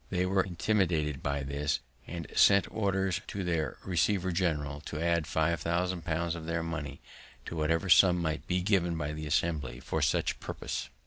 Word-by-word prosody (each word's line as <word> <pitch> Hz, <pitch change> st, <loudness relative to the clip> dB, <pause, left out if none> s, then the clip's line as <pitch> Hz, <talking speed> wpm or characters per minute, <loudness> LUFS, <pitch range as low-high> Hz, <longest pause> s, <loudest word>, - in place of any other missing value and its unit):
They 90 Hz, -1 st, 0 dB
were 95 Hz, +1 st, +3 dB
intimidated 85 Hz, -6 st, 0 dB
by 70 Hz, -1 st, -1 dB
this, 70 Hz, +2 st, -1 dB, 0.3 s
and 85 Hz, -2 st, -5 dB
sent 100 Hz, -1 st, +6 dB
orders 95 Hz, -3 st, 0 dB
to 100 Hz, -, -4 dB
their 80 Hz, -5 st, -1 dB
receiver 95 Hz, +1 st, +1 dB
general 75 Hz, -5 st, -1 dB
to 75 Hz, -, -5 dB
add 85 Hz, -1 st, +1 dB
five 80 Hz, +1 st, +1 dB
thousand 85 Hz, +1 st, -1 dB
pounds 85 Hz, 0 st, -1 dB
of 80 Hz, -2 st, -6 dB
their 85 Hz, 0 st, -1 dB
money 75 Hz, -4 st, -5 dB, 0.4 s
to -, -, -6 dB
whatever 80 Hz, +4 st, 0 dB
sum 90 Hz, 0 st, +7 dB
might 80 Hz, -2 st, -2 dB
be 90 Hz, 0 st, 0 dB
given 90 Hz, -4 st, +2 dB
by 75 Hz, -1 st, -3 dB
the 75 Hz, 0 st, -5 dB
Assembly 75 Hz, -5 st, -1 dB
for -, -, -2 dB
such -, -, +1 dB
purpose. -, -, -5 dB
85 Hz, 175 wpm, -30 LUFS, 75-90 Hz, 0.4 s, sum